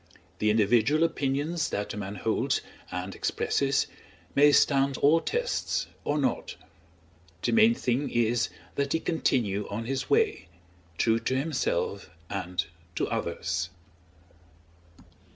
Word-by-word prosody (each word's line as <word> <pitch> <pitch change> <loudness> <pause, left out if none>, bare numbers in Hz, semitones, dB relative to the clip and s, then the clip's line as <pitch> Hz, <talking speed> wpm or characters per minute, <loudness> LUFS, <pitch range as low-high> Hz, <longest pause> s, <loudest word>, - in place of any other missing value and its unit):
The 105 - +2
individual 115 +8 +3
opinions 150 +2 0
that 105 0 -3
a - - -6
man 100 0 -5
holds 90 - 0 0.3
and 90 +2 -4
expresses 140 -1 0 0.5
may 145 +1 +6
stand 140 -1 +3
all 155 +4 +5
tests 485 - -1 0.2
or 145 - 0
not; 130 -4 -1 0.9
the - - +1
main 225 +1 +6
thing 130 - 0
is 120 0 +1 0.2
that 140 0 -1
he 165 - +2
continue 115 - 0
on 110 +3 -4
his 135 +2 -3
way, - - +2 0.5
true 115 0 +3
to 130 - -1
himself 130 - -1 0.2
and 90 -2 -2 0.3
to - - 0
others! 85 0 -2
130 Hz, 120 wpm, -28 LUFS, 105-145 Hz, 0.9 s, may